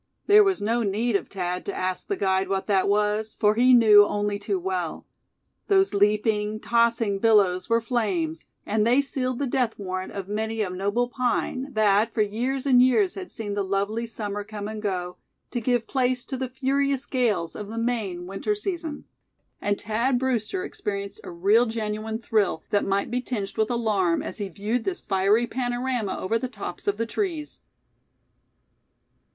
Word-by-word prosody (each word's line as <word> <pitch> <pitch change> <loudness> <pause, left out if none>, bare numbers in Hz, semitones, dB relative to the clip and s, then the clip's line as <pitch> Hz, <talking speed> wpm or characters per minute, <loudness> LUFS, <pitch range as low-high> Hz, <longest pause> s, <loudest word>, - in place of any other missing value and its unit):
There 420 +1 +7
was 385 - 0
no 230 +3 +1
need 220 +2 0
of - - 0
Thad 180 -2 -3
to - - -3
ask 185 0 -2
the 400 - -1
guide 190 - +1
what 195 -1 -1
that 200 -2 +2
was, 210 +1 0
for 210 0 +4
he 245 +3 +4
knew 220 -4 +8
only 205 0 -1
too 385 - -1
well. 370 0 -3 0.6
Those 385 -1 +3
leaping, 210 +1 +1
tossing 230 -3 +2
billows 200 -4 +3
were 230 0 +3
flames; 195 -10 -1 0.2
and 210 +1 +1
they 245 +3 +4
sealed 255 -3 -1
the 285 - -1
death 245 -3 0
warrant 185 -2 -4
of 195 -2 -5
many 220 +1 -2
a 185 - -3
noble 200 +6 0
pine 255 +2 -1
that 215 +1 +3
for 215 - +2
years 250 +6 -2
and 255 -3 +6
years 260 +10 +3
had 375 -2 -8
seen 210 -2 -5
the 200 - -1
lovely 200 +4 -1
summer 205 -2 -4
come 205 -1 -6
and 215 0 -6
go, 180 -3 -3 0.3
to 240 - -2
give 240 0 +1
place 255 -1 0
to 270 - -4
the 260 -1 -3
furious 275 +1 0
gales 225 -10 0
of 210 - -6
the 225 +2 -7
Maine 220 -7 -2
winter 195 - -2
season. 340 -7 -3 0.6
And 205 0 0
Thad 235 +4 0
Brewster 260 - -1
experienced 200 - -5
a - - -8
real 200 +8 +3
genuine 220 0 -3
thrill, 215 -7 0
that 205 - +2
might 195 +2 0
be 250 +1 0
tinged 210 -6 -4
with 220 0 +1
alarm, 210 -8 +1
as - - -6
he 200 -2 -3
viewed 210 +7 -2
this 370 -2 -3
fiery 200 +4 +2
panorama 245 -2 -2
over 225 +5 -1
the 255 - -3
tops 255 - -8
of 405 - +1
the 230 - -1
trees. 320 - -3
220 Hz, 180 wpm, -25 LUFS, 200-250 Hz, 0.6 s, knew